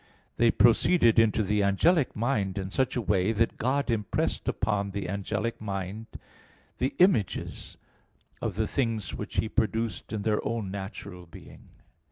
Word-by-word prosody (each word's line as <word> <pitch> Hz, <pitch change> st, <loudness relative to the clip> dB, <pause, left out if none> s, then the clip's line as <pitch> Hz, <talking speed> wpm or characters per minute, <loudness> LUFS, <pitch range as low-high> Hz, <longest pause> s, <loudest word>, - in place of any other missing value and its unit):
They 115 Hz, 0 st, +4 dB
proceeded 115 Hz, +1 st, +4 dB
into 110 Hz, -1 st, +3 dB
the 105 Hz, +1 st, +1 dB
angelic 130 Hz, -, +2 dB
mind 105 Hz, -5 st, -1 dB
in 95 Hz, 0 st, -4 dB
such 130 Hz, +3 st, 0 dB
a 120 Hz, -, 0 dB
way, 95 Hz, 0 st, +2 dB
that 115 Hz, +1 st, 0 dB
God 130 Hz, +2 st, 0 dB
impressed 105 Hz, -4 st, -1 dB
upon 100 Hz, 0 st, -1 dB
the 100 Hz, 0 st, -4 dB
angelic 100 Hz, +4 st, -3 dB
mind 100 Hz, +1 st, -5 dB, 0.7 s
the 130 Hz, -, -1 dB
images 175 Hz, -, +1 dB, 0.6 s
of -, -, -2 dB
the -, -, 0 dB
things 115 Hz, -7 st, -1 dB
which -, -, -6 dB
He -, -, +1 dB
produced 110 Hz, -3 st, -2 dB
in 105 Hz, -2 st, -3 dB
their 105 Hz, 0 st, 0 dB
own 110 Hz, -4 st, -3 dB
natural 95 Hz, -2 st, -7 dB
being. 80 Hz, -, -14 dB
110 Hz, 150 wpm, -28 LUFS, 100-115 Hz, 0.7 s, They